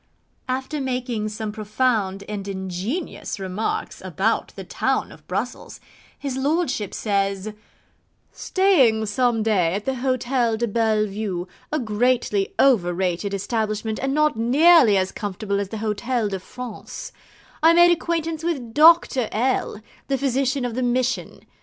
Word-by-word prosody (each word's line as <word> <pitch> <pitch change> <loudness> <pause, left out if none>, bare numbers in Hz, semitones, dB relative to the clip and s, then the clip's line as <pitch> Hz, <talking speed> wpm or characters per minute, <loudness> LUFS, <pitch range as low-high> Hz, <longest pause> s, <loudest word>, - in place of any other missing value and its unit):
After 265 +3 -2
making 250 -4 -2
some 215 0 -4
profound 215 -2 -1
and 205 -2 -5
ingenious 195 - -4
remarks 210 - -3
about - - -1
the - - -7
town - - -1
of - - -16
Brussells, - - -4 0.4
his 275 -3 -4
lordship 270 - 0
says: 200 0 -1 0.8
'Staying 270 - +3
some 225 +1 +1
day 185 -6 +2
at 205 - -4
the 265 - 0
Hotel 250 -2 0
de 235 +1 0
Belle 220 -1 +1
Vue, 195 -3 -4 0.2
a 305 - +1
greatly 230 -4 0
overrated 185 -5 +2
establishment, 215 +1 -2
and 270 0 0
not 305 -2 +3
nearly 255 - +5
as 190 0 0
comfortable 200 0 -3
as 200 -1 -3
the 220 - -5
Hotel 220 +2 -1
de 195 -1 -3
France 250 - -8 0.5
I 325 +1 +7
made 345 +1 +7
acquaintance 330 -1 -1
with 270 -9 -3
Dr. 305 -5 +5
L, 235 -2 -1 0.3
the 275 - 0
physician 270 0 0
of 245 - -3
the 255 - -2
Mission. 250 +1 -1
230 Hz, 135 wpm, -23 LUFS, 205-265 Hz, 0.8 s, I